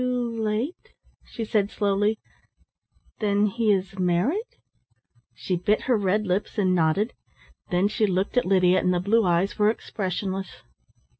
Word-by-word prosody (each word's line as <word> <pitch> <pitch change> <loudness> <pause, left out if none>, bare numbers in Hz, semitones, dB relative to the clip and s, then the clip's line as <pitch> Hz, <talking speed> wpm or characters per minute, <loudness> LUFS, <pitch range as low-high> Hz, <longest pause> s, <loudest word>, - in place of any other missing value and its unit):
"Too 245 -2 -1
late," 220 +9 -3 0.3
she 225 - -5
said 205 -2 +1
slowly, 205 +1 0 1.0
"then 205 -1 +2
he 215 +1 +1
is 190 -1 -1
married?" 190 - 0 0.8
She 185 - -2
bit 205 +5 +1
her 250 - +1
red 205 +1 +1
lips 190 +4 -2
and 185 -3 +2
nodded, 180 +6 +1 0.6
then 180 +1 +2
she 215 +1 0
looked 190 +4 -1
at 250 - +3
Lydia, 185 -1 +4
and 180 0 +1
the - - +1
blue 215 +5 +2
eyes 175 +4 +1
were 210 0 +5
expressionless. 190 -3 -4
200 Hz, 145 wpm, -25 LUFS, 185-220 Hz, 1.0 s, were